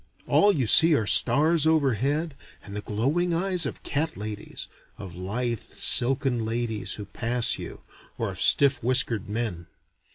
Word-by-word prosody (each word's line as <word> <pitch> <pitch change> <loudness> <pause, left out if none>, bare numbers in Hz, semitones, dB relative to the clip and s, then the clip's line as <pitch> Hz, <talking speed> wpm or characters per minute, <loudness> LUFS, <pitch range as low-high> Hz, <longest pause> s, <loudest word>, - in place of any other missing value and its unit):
All 205 - +3
you 140 -10 -1
see 160 +7 +6
are 110 - -1
stars 155 - +3
overhead 145 +1 0 0.3
and 100 0 -10
the 105 - -4
glowing 145 +13 -1
eyes 180 -3 0
of - - -9
cat 160 +3 -3
ladies, 105 0 -6 0.3
of 95 -4 -10
lithe 110 +6 -3
silken 125 -1 0
ladies 115 -1 -3
who 105 - -8
pass 120 +2 0
you, - - -9 0.3
or - - -3
of - - -6
stiff 140 -3 +4
whiskered 115 -4 +2
men. 105 -6 -4
125 Hz, 150 wpm, -25 LUFS, 110-155 Hz, 0.3 s, see